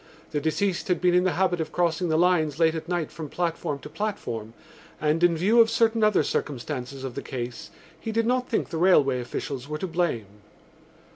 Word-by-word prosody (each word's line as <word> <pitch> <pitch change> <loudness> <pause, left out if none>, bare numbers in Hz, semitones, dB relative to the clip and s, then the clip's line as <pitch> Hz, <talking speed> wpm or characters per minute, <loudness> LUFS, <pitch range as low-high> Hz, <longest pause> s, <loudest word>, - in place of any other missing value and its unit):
The 150 - -1
deceased 170 +4 0
had 180 -2 +1
been 180 -1 +3
in 180 +1 +4
the 185 - +2
habit 180 -2 +1
of 160 - -4
crossing 175 0 0
the 155 - +2
lines 160 -4 +2
late 160 -1 +3
at 165 +1 -6
night 175 -4 -1
from 155 -1 -7
platform 165 -4 -2
to - - -8
platform 120 - -4 0.4
and, 155 +2 +1
in 170 -2 +4
view 215 +8 +5
of 225 - +4
certain 230 -1 +2
other 210 -7 +4
circumstances 135 -1 -3
of 130 -2 -4
the - - -5
case, 120 -1 -6 0.3
he 225 - -4
did 225 +1 +1
not 250 +1 0
think 230 - 0
the 165 - -4
railway 145 -8 +4
officials 130 +2 -5
were 150 - -2
to 170 - -3
blame. 165 - -1
165 Hz, 205 wpm, -26 LUFS, 145-185 Hz, 0.4 s, view